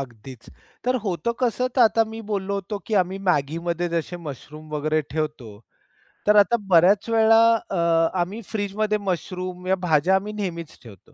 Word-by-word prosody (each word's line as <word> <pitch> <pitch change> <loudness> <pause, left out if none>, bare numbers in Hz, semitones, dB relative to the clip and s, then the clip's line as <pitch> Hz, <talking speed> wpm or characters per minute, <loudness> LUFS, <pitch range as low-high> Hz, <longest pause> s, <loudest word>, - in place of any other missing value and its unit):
अगदीच 125 -1 -10 0.4
तर 255 - +1
होतं 190 +4 -1
कसं, 250 +1 +1
तर - - +4
आता 225 0 +4
मी 220 +1 -8
बोललो 200 0 -2
होतो 200 +1 -4
की 220 - -2
आम्ही 190 +2 -7
MAGGIमध्ये 170 +3 0
जसे 170 +1 -3
मशरूम 155 -1 -10
वगैरे 155 +1 0
ठेवतो. 150 -9 -4 0.7
तर 210 - +5
आता 235 +4 +5
बऱ्याच 190 +5 +4
वेळा 225 0 +5 0.2
अ, 200 -4 -4 0.4
आम्ही 200 +6 -4
फ्रिजमध्ये 210 0 -1
मशरूम 185 -1 -4
या 190 - +3
भाज्या 160 +5 +3
आम्ही 205 +2 -2
नेहमीच 170 -6 -5
ठेवतो. 100 -6 -16
185 Hz, 155 wpm, -23 LUFS, 155-210 Hz, 0.7 s, तर